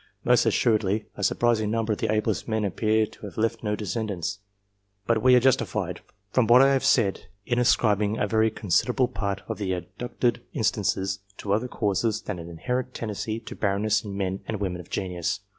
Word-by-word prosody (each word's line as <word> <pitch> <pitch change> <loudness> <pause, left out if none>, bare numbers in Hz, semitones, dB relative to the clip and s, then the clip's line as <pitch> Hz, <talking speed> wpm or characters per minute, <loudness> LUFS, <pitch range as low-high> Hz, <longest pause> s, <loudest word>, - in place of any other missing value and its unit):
Most - - +4
assuredly, 105 -2 +2
a 100 - -5
surprising 110 -1 +2
number 115 0 0
of - - -5
the 110 - 0
ablest 110 -1 0
men 110 -2 0
appear 110 +3 +1
to 105 - -12
have - - -12
left 115 +1 0
no 105 -2 -1
descendants; 105 -3 -3 0.7
but 115 0 +2
we 125 +1 +6
are - - +7
justified, 130 0 0 0.3
from 125 -4 +3
what 125 +2 +7
I 135 0 +5
have 135 - +1
said, 100 -6 +2 0.2
in 120 -1 0
ascribing 105 -3 +2
a - - +1
very 110 +1 +2
considerable 120 +5 +1
part 100 -4 -3
of - - -4
the 95 -3 -1
adduced 120 +5 -2
instances 95 -3 0 0.2
to 100 - -2
other 110 +4 0
causes 110 -1 0
than 100 -4 -4
an 85 0 -8
inherent 125 +10 -3
tendency 110 0 -3
to - - -9
barrenness 105 +1 +1
in 100 -2 -6
men 95 -1 -2
and 110 -3 -3
women 90 -3 -3
of 85 - -17
genius. 90 -3 -2
110 Hz, 190 wpm, -26 LUFS, 100-115 Hz, 0.7 s, are